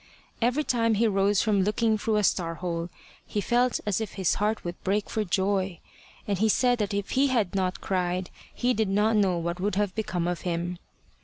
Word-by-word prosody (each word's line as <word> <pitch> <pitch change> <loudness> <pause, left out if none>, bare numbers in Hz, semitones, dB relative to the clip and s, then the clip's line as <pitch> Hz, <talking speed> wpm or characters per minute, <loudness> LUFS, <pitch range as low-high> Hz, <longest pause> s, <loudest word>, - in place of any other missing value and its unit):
Every 250 +6 +2
time 230 -4 +1
he 225 +3 +2
rose 200 0 +2
from 210 -3 +2
looking 220 +3 +2
through 215 +1 -1
a 210 - +2
star 170 -3 +1
hole, 170 0 -3 0.3
he 210 - -3
felt 245 +3 +2
as 210 0 0
if 220 - -4
his 190 -4 +1
heart 215 +1 0
would 175 0 -6
break 200 +2 0
for, 220 - 0
joy; 190 -1 0 0.5
and 200 -3 -1
he 220 +1 +3
said 245 +2 +3
that 210 -1 -1
if 200 -1 -3
he 275 +2 +3
had 230 -8 0
not 185 -1 -1
cried, 180 -1 -1 0.2
he 250 +1 0
did 220 -3 0
not 210 +3 +2
know 195 -4 +3
what 170 +1 -3
would 200 +1 -1
have 205 -2 0
become 185 -5 -2
of 175 -1 -2
him. 175 0 -3
200 Hz, 210 wpm, -27 LUFS, 180-220 Hz, 0.5 s, he